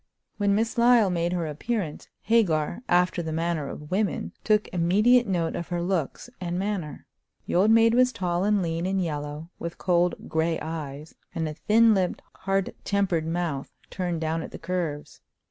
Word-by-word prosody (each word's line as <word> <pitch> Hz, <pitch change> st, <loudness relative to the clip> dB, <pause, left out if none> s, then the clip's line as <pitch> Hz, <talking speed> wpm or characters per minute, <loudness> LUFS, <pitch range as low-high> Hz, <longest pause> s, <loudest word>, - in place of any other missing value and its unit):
When 200 Hz, -1 st, +2 dB
Miss 225 Hz, +3 st, 0 dB
Lyle 235 Hz, -4 st, +5 dB
made 170 Hz, 0 st, 0 dB
her 175 Hz, -2 st, -1 dB
appearance, 160 Hz, +2 st, -3 dB, 0.2 s
Hagar, 180 Hz, -7 st, +2 dB
after 180 Hz, 0 st, +3 dB
the 160 Hz, -1 st, -4 dB
manner 160 Hz, -2 st, -1 dB
of 150 Hz, 0 st, -9 dB
women, 200 Hz, +1 st, -1 dB
took 210 Hz, -1 st, +2 dB
immediate 210 Hz, +8 st, +4 dB
note 170 Hz, -4 st, 0 dB
of 170 Hz, -, -4 dB
her 175 Hz, -1 st, -2 dB
looks 175 Hz, -, -2 dB
and 175 Hz, -1 st, -3 dB
manner. 190 Hz, -5 st, -3 dB, 0.4 s
The -, -, -4 dB
old 190 Hz, +5 st, +4 dB
maid 225 Hz, 0 st, +5 dB
was 250 Hz, +1 st, +4 dB
tall 180 Hz, -5 st, -1 dB
and 205 Hz, -1 st, +2 dB
lean 165 Hz, +1 st, -2 dB
and 195 Hz, 0 st, 0 dB
yellow, 150 Hz, -1 st, -4 dB
with 170 Hz, 0 st, -5 dB
cold 175 Hz, -1 st, +1 dB
gray 160 Hz, +1 st, 0 dB
eyes, 155 Hz, -2 st, -6 dB, 0.2 s
and 160 Hz, -1 st, -1 dB
a 155 Hz, -, -4 dB
thin 220 Hz, +7 st, +4 dB
lipped, 185 Hz, -3 st, -1 dB
hard 195 Hz, -1 st, -1 dB
tempered 185 Hz, -5 st, 0 dB
mouth, 165 Hz, -5 st, -2 dB, 0.2 s
turned 175 Hz, -4 st, -2 dB
down 160 Hz, +1 st, -1 dB
at -, -, -7 dB
the -, -, -9 dB
curves. 165 Hz, -4 st, -4 dB
175 Hz, 175 wpm, -26 LUFS, 160-200 Hz, 0.4 s, Lyle